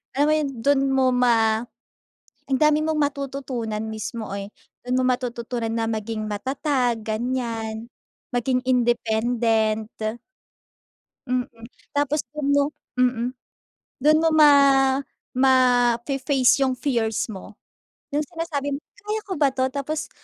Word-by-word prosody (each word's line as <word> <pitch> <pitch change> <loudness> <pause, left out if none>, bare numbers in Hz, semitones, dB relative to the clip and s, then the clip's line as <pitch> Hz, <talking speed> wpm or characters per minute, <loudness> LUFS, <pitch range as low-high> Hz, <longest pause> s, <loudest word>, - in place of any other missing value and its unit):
alam 285 - +3
mo - - +4
yun, 305 -2 0
dun 280 -1 +3
mo 265 -1 +3
ma 230 -3 +3 0.8
ang 265 -1 -1
dami 305 0 +4
mong 315 -1 0
matututunan 275 -6 -2
mismo 220 +1 -5
eh. 200 +1 -6 0.3
Dun 250 +1 0
mo 255 - +1
matututunan 240 -2 -2
na 225 0 -1
maging 220 -1 -3
matatag, 255 +2 -1
ganyan. 225 -1 -3 0.5
Maging 250 +1 +1
independent. 225 -2 +1 1.4
Mm. 250 0 +1 0.5
Tapos 290 +1 +1
dun 300 -2 -3
mo 285 - +4 0.4
mm, 245 -1 +2 0.8
dun 305 +1 +6
mo 325 - +4
ma 300 -2 +8 0.8
mafe-face 255 +1 +3
yung 260 - 0
fears 230 -5 -1
mo. 195 +1 -10 0.6
Yung 295 +1 0
sinasabi 295 -4 -3
mo, 280 - -6 0.2
"Kaya 425 +1 -3
ko 385 - -4
ba 285 -2 +4
'to?" 260 0 +1
Tapos 290 +3 -3
250 Hz, 120 wpm, -23 LUFS, 225-280 Hz, 1.4 s, ma